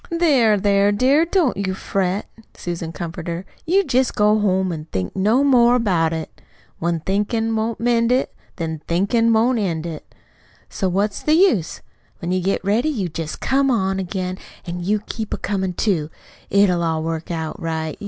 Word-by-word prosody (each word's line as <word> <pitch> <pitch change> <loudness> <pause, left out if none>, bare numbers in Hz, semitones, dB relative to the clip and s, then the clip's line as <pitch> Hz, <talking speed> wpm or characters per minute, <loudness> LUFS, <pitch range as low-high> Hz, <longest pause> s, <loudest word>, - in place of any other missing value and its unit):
"There, 280 -11 +3
there, 200 0 +3
dear, 265 +9 +3
don't 340 -6 +1
you 190 -1 -2
fret," 190 +1 -1 0.3
Susan 170 -2 -4
comforted 170 0 -5
her. 180 +3 -7 0.2
"You 385 +4 +4
jest 260 -5 +1
go 210 +1 +3
home 190 -2 +1
and 155 -1 -7
think 95 -1 -3
no 215 +8 +3
more 245 -3 +5
about 180 -9 +2
it. 160 -1 -6 0.4
When 170 -1 -1
thinkin' 225 +5 0
won't 220 +1 -2
mend 235 0 +2
it, 255 +2 +1 0.2
Then 160 -3 -4
thinkin' 200 +7 +2
won't 230 +2 +3
end 170 -5 -2
it. 160 -3 -7 0.6
So 190 - -1
what's 200 +3 -1
the 305 - +3
use? 255 - +2 0.4
When 170 - -4
you 185 0 +1
get 195 +1 -1
ready, 225 +9 +2
you 205 - -2
jest 160 0 -6
come 275 +1 +2 0.3
again; 185 0 -3 0.3
an' 175 0 -5
you 205 +3 0
keep 220 -2 -4
a - - -8
comin', 190 -2 -2
too. 170 -6 0 0.4
It'll 195 -3 +3
all 160 -1 0
work 165 0 -4
out 160 -2 -4
right. 160 -1 -3
195 Hz, 175 wpm, -21 LUFS, 170-230 Hz, 0.6 s, more